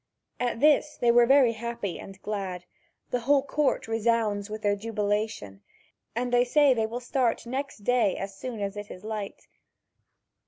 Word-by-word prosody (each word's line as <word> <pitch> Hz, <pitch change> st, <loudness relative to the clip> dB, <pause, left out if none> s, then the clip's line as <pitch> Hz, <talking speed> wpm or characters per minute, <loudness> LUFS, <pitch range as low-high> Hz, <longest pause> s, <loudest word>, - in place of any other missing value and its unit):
At 245 Hz, -1 st, -1 dB
this 300 Hz, 0 st, +4 dB
they 240 Hz, -1 st, +4 dB
were 240 Hz, 0 st, +5 dB
very 270 Hz, -3 st, +6 dB
happy 230 Hz, -4 st, -4 dB
and 195 Hz, -1 st, -10 dB
glad; 190 Hz, -4 st, -4 dB, 0.5 s
the 250 Hz, -, +1 dB
whole 275 Hz, +3 st, +3 dB
court 290 Hz, -3 st, 0 dB
resounds 225 Hz, -2 st, 0 dB
with 215 Hz, 0 st, -6 dB
their 205 Hz, -1 st, +2 dB
jubilation, 205 Hz, -, -2 dB, 0.5 s
and 245 Hz, +1 st, -2 dB
they 245 Hz, 0 st, +5 dB
say 280 Hz, +2 st, +4 dB
they 225 Hz, -2 st, 0 dB
will 235 Hz, +2 st, -5 dB
start 245 Hz, -1 st, 0 dB
next 260 Hz, -3 st, -5 dB
day 245 Hz, -4 st, +2 dB
as 195 Hz, 0 st, -5 dB
soon 230 Hz, +1 st, -6 dB
as 200 Hz, 0 st, -3 dB
it 205 Hz, 0 st, -7 dB
is 180 Hz, -, -10 dB
light. 215 Hz, -2 st, -6 dB
230 Hz, 165 wpm, -27 LUFS, 205-245 Hz, 0.5 s, very